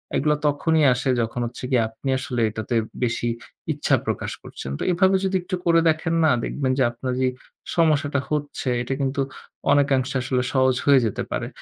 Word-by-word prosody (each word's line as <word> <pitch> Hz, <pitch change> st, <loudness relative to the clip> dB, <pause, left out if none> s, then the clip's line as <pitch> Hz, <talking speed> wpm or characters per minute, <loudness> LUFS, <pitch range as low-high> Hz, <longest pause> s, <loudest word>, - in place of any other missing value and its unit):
এইগুলা 150 Hz, +2 st, +2 dB
তখনই 155 Hz, +2 st, +2 dB
আসে 125 Hz, +2 st, -2 dB
যখন 115 Hz, +2 st, -3 dB
হচ্ছে 120 Hz, +2 st, -8 dB
গিয়ে 125 Hz, -3 st, +4 dB
আপনি 115 Hz, +4 st, -6 dB
আসলে 125 Hz, -2 st, -2 dB
এটাতে 110 Hz, +2 st, -4 dB, 0.3 s
বেশি 120 Hz, 0 st, 0 dB, 0.5 s
ইচ্ছা -, -, +2 dB
প্রকাশ -, -, -2 dB
করছেন। 65 Hz, -, -7 dB
তো -, -, -2 dB
এভাবে 190 Hz, +2 st, +3 dB
যদি 190 Hz, 0 st, 0 dB
একটু 185 Hz, +1 st, -3 dB
করে 165 Hz, -1 st, +5 dB
দেখেন 160 Hz, +1 st, 0 dB
না 155 Hz, -, +5 dB
দেখবেন 135 Hz, -3 st, -1 dB
যে -, -, +5 dB
আপনার 125 Hz, +2 st, -4 dB
যে 130 Hz, -, +3 dB, 0.5 s
সমস্যাটা 150 Hz, -4 st, +2 dB
হচ্ছে 145 Hz, -3 st, -2 dB
এটা 120 Hz, +2 st, -2 dB
কিন্তু 135 Hz, +1 st, 0 dB, 0.5 s
অনেকাংশে 135 Hz, -2 st, +2 dB
আসলে 125 Hz, 0 st, 0 dB
সহজ 130 Hz, -1 st, +3 dB
হয়ে 140 Hz, -2 st, +6 dB
যেতে 110 Hz, -, -2 dB
পারে। -, -, -2 dB
135 Hz, 175 wpm, -23 LUFS, 125-155 Hz, 0.5 s, হয়ে